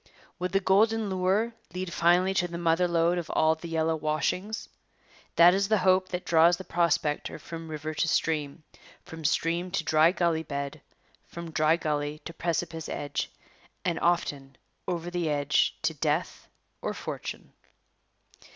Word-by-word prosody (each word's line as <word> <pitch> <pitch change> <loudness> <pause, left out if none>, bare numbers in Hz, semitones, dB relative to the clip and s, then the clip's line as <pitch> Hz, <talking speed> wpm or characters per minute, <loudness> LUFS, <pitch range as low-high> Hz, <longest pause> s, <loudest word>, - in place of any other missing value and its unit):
Would 180 +1 -2
the 195 - +4
golden 215 +2 +2
lure 190 +5 +1 0.2
lead 185 -1 -4
finally 180 +3 +3
to 180 -2 +1
the 170 -1 -6
mother 170 +1 +2
lode 170 +1 +2
of 170 - -7
all 160 0 +3
the 160 +1 -8
yellow 160 0 +1
washings? 155 +7 -2 0.7
That 175 +1 +8
is 195 +1 +1
the 215 +1 +3
hope 185 0 +4
that 180 0 -4
draws 170 +1 +5
the 190 - -8
prospector 165 -4 0
from 165 -1 -8
river 155 0 -4
to 165 - 0
stream, 155 -1 -1 0.4
from 165 0 -10
stream 170 +3 0
to 180 -2 -1
dry 160 +1 +4
gully 170 -3 +1
bed, 140 -2 -5 0.5
from 170 -1 -8
dry 155 +1 +3
gully 150 -2 -2
to 165 - -6
precipice 165 -1 -3
edge, 145 -1 -3 0.6
and 170 -2 0
often 140 -6 -1 0.3
over 175 -1 -3
the 175 -2 -1
edge 145 0 +1
to 160 0 +1
death 155 +3 -2 0.3
or - - -3
fortune. - - -6
170 Hz, 155 wpm, -28 LUFS, 155-180 Hz, 0.7 s, That